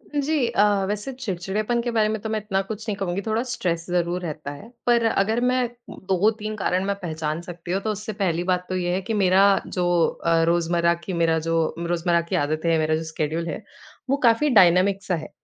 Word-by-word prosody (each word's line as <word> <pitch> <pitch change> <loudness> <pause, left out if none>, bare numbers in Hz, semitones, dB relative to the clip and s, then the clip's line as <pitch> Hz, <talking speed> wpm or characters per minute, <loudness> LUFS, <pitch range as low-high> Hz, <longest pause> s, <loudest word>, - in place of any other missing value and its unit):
जी 290 -2 +1
अ, 205 -3 +2
वैसे 210 +6 -3
चिड़चिड़ेपन 215 0 -2
के 240 - -2
बारे 220 -2 +2
में 220 0 -2
तो 220 - -4
मैं 220 0 0
इतना 195 -2 -1
कुछ 215 +3 -7
नहीं 210 - -1
कहूँगी 195 -1 -2
थोड़ा 220 +3 -1
स्ट्रेस 170 -8 -2
ज़रूर 175 0 0
रहता 155 -4 -5
है। 145 +11 -11 0.2
पर 235 -1 +3
अगर 220 +2 +1
मैं 250 0 +2 0.2
2-3 215 +3 -1
कारण 185 -2 0
में 200 0 0
पहचान 160 -2 -3
सकती 175 0 -8
हूँ, 195 +2 0
तो 220 - -1
उससे 210 +1 -5
पहली 180 -4 -1
बात 180 0 0
तो 185 - -2
ये 175 -1 -1
है, 190 - -1
कि 210 +4 -4
मेरा 195 -1 +4 0.2
जो 180 -1 -1 0.4
अ, 165 -1 +3
रोजमर्रा 170 0 +2
की 190 - -4
मेरा 165 -1 +2
जो 165 0 0
रोजमर्रा 170 0 +1
की - - 0
आदत 155 +2 -2
है, 165 -1 +3
मेरा 155 0 +1
जो 160 - -3
शेड्यूल 160 +1 -3
है, 165 +7 -5 0.5
वो 275 - +2
काफ़ी 235 +6 +3
डायनामिक 190 -2 +4
सा 185 - 0
है। 155 -2 -7
185 Hz, 215 wpm, -23 LUFS, 170-215 Hz, 0.5 s, मेरा